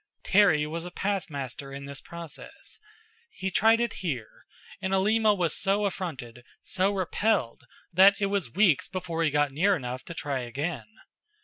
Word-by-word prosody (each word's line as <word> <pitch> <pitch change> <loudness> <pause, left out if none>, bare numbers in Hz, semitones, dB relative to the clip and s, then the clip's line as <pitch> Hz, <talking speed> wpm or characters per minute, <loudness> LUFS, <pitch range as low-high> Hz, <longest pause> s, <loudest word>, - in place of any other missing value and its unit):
Terry 180 -7 +4
was 165 +2 -4
a 180 - -6
past 195 +1 -2
master 140 -1 -6
in 140 0 -7
this 140 -1 -6
process. 170 -2 -9 0.5
He 190 0 -4
tried 225 +4 +4
it 235 -2 0
here, 130 - -5 0.3
and 190 0 0
Alima 215 +2 +3
was 175 -4 0
so 200 +1 +1
affronted, 135 -11 -5 0.2
so 190 +1 +1
repelled, 195 - 0 0.3
that 195 +3 +7
it 200 - +2
was 195 - -1
weeks 185 - +3
before 175 -3 -3
he 160 - +3
got 145 0 +1
near 190 +8 +3
enough 130 -4 -5
to 170 - -8
try 140 -4 -2
again. 140 +7 -4
170 Hz, 165 wpm, -27 LUFS, 140-195 Hz, 0.5 s, that